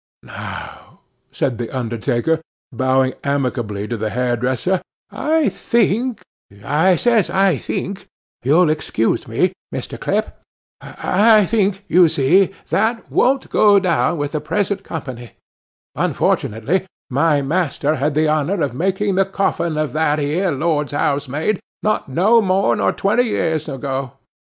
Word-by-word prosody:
'Now,' - - -9 0.3
said 125 -4 -2
the 120 - -3
undertaker, 120 +5 -1 0.3
bowing 130 +1 +1
amicably 120 -7 -2
to 120 - -3
the 110 0 -2
hairdresser, 125 - 0 0.3
'I 315 -1 +1
think, 235 +2 0 0.4
I 160 +6 +3
says 225 +1 +2
I 190 -5 +2
think—you'll 175 -4 -1
excuse 135 -7 -1
me, - - +1 0.2
Mr. - - -6
Clip, - - -1 0.5
I 210 +2 +3
think, 200 -1 0
you 175 0 +5
see, 165 +6 +3 0.2
that 225 +1 0
won't 265 +1 +1
go 205 -1 +5
down 175 -2 +1
with 145 -1 -2
the 155 - -2
present 200 -1 -1
company—unfortunately, 130 - -3 0.2
my 145 +2 +2
master 155 -1 0
had 145 +2 -1
the 155 +1 +2
honour 155 +5 0
of 140 - -2
making 195 +7 0
the 195 +1 +3
coffin 180 -4 -1
of 155 -1 -1
that 155 -1 +1
ere 165 +6 0
Lord's 150 0 -1
housemaid, 145 +6 -1 0.2
not 215 -8 0
no 205 - +4
more 195 -1 +2
nor - - +1
twenty 215 +5 +1
year 160 -8 0
ago. 135 -2 -4
160 Hz, 130 wpm, -19 LUFS, 135-195 Hz, 0.5 s, you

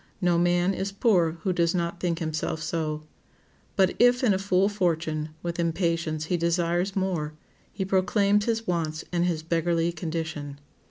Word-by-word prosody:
No 175 -3 +2
man 175 +2 +2
is 195 +1 -3
poor 190 -6 +2
who 190 -3 +1
does 170 0 +1
not 170 0 -2
think 170 -2 -1
himself 160 -1 -2
so. 155 -1 -2 0.7
But 190 -2 +3
if 245 +1 +5
in 225 -5 +4
a 190 - 0
full 195 0 +2
fortune, 160 -6 -1
with 170 0 -3
impatience 165 -2 0
he 175 +2 0
desires 175 +2 0
more, 180 -6 -1 0.4
he 190 - -3
proclaims 200 +2 +2
his 225 -1 -1
wants 160 -4 -2
and 175 0 +1
his 165 -3 -1
beggarly 170 0 +1
condition. 160 -3 -4
175 Hz, 160 wpm, -26 LUFS, 165-190 Hz, 0.7 s, if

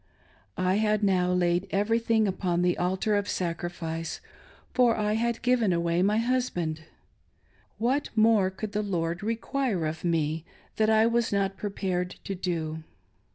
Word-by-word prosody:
I 185 +1 +2
had 215 0 +1
now 180 -2 +2
laid 175 +1 +1
everything 220 +2 +2
upon 180 -2 0
the 180 0 +2
altar 190 +4 0
of 205 0 -1
sacrifice, 165 -2 -3 0.5
for 245 -2 +4
I 210 0 +1
had 235 +1 -1
given 245 -5 +3
away 170 0 +1
my 205 +3 +3
husband. 220 -11 -1 0.9
What 260 +6 0
more 215 -3 +4
could 200 +2 -6
the 210 0 -1
Lord 170 -4 -2
require 230 - -1
of 155 +1 -4
me 160 -2 0 0.3
that 215 0 +3
I 220 0 +5
was 235 0 +1
not 195 -1 0
prepared 190 -3 -3
to 195 - -4
do 165 -4 -3
195 Hz, 145 wpm, -27 LUFS, 175-220 Hz, 0.9 s, I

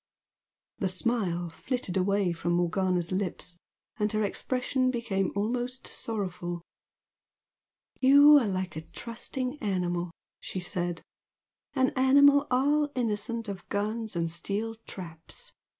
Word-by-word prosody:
The 195 - +1
smile 185 -4 0
flitted 245 +2 -3
away 195 0 +2
from 170 +1 -2
Morgana's 175 0 +1
lips, 185 -2 -3 0.4
and 210 0 0
her 215 0 +1
expression 255 +5 0
became 230 -6 -1
almost 245 +5 -2
sorrowful. 180 -5 -3 1.4
"You 285 +3 +8
are 235 - -1
like 185 -3 -3
a 155 - -4
trusting 250 - -4
animal!" 180 -3 -1 0.3
she 185 - -5
said 175 -1 -2 0.7
"An 260 -1 +3
animal 280 +2 +5
all 290 +3 +2
innocent 230 -1 -2
of 195 -3 -7
guns 215 +1 -2
and 165 -1 -1
steel 200 +6 -2
traps! 165 -4 -9
205 Hz, 115 wpm, -28 LUFS, 180-250 Hz, 1.4 s, You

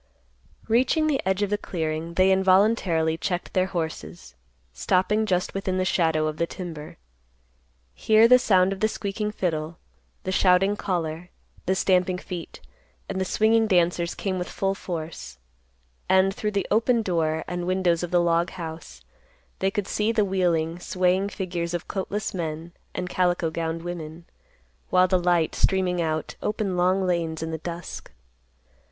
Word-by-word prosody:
Reaching 255 +7 +2
the 295 -3 +1
edge 190 +2 +1
of 205 - -2
the 205 - +1
clearing, 165 -2 -3
they 185 +1 +4
involuntarily 190 -4 +3
checked 180 0 -3
their 185 0 +2
horses, 85 - -5 0.4
stopping 210 - +1
just 180 -2 0
within 190 -1 -2
the 185 - +1
shadow 160 -4 +2
of 155 0 -3
the 170 - 0
timber. 165 -5 -8 1.0
Here 220 - +5
the 250 +1 +7
sound 190 -4 +3
of 195 - -9
the 215 - +3
squeaking 210 0 -3
fiddle, 165 -5 -2 0.5
the 185 - -2
shouting 190 +2 +3
caller, 175 -4 -3 0.4
the 190 - +2
stamping 185 -1 +2
feet, 180 -2 -8 0.5
and 190 -1 -3
the - - 0
swinging 220 +3 +3
dancers 175 -2 +1
came 190 -2 -2
with 180 - -4
full 195 0 -1
force; 165 - -6 0.7
and, 190 +1 +4
through 210 - -2
the 200 - -1
open 230 +2 +3
door 160 -4 0
and 175 0 -4
windows 180 -2 +1
of 175 - -3
the 180 - +2
log 170 0 +2
house, 165 -2 -8 0.6
they 190 - +2
could 200 0 -3
see 215 +1 0
the 220 -2 +2
wheeling, 175 -3 0
swaying 185 +2 +1
figures 175 -3 -3
of 175 - -5
coatless 200 +1 -3
men 165 -1 -4 0.2
and 180 - -3
calico 180 -2 +1
gowned 165 0 -3
women, 170 -1 -7 0.6
while 185 0 +4
the 185 0 +2
light, 175 -2 +2
streaming 185 -2 +1
out, 155 -1 -2
opened 210 -3 -1
long 185 +2 +2
lanes 165 -3 -1
in 160 - -4
the 160 - -4
dusk. 170 +2 -7
180 Hz, 160 wpm, -25 LUFS, 165-195 Hz, 1.0 s, the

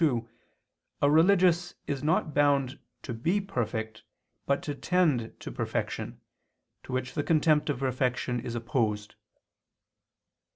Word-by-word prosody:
2), 120 -8 +2 0.8
a 145 - +5
religious 175 +1 +4
is 140 -2 -3
not 155 0 +1
bound 140 -2 +2 0.2
to 120 - -4
be 165 - +1
perfect, 110 - -3 0.5
but 140 0 +1
to 145 - -3
tend 145 -7 +1
to - - -7
perfection, - - -3 0.6
to - - -10
which 130 0 -2
the 150 - 0
contempt 155 -1 +3
of 145 - 0
perfection 125 -1 0
is 120 0 -5
opposed. 110 -4 -1
140 Hz, 125 wpm, -29 LUFS, 120-160 Hz, 0.8 s, a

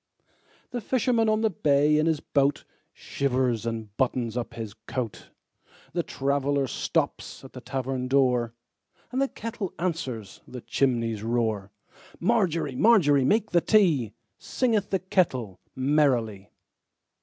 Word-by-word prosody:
The 245 - -3
fisherman 235 -2 +1
on 215 0 +2
the 220 -1 +2
bay 150 -2 +3
in 155 - +2
his 160 -2 +1
boatShivers 130 -3 -1
and 110 -3 -5
buttons 125 -3 0
up 120 -1 -4
his 110 -3 -6
coat; 120 -5 -4 0.6
The 175 - +1
traveller 140 -1 0
stops 125 - -2
at - - -12
the - - -9
tavern 130 -1 -3
door, 125 -3 +2 0.6
And 260 +2 0
the 275 - +3
kettle 225 -6 -5
answers 130 - -4
the 125 -1 -8
chimney's 115 -6 0
roar. 110 -4 -1 0.5
Margery, 170 - +1
Margery, 150 - +5
make 215 - +2
the 175 - +4
tea, 165 - +3 0.3
Singeth 225 -6 0
the 195 - +1
kettle 145 - -1 0.2
merrily. 130 -8 +1
140 Hz, 125 wpm, -26 LUFS, 120-180 Hz, 0.6 s, Margery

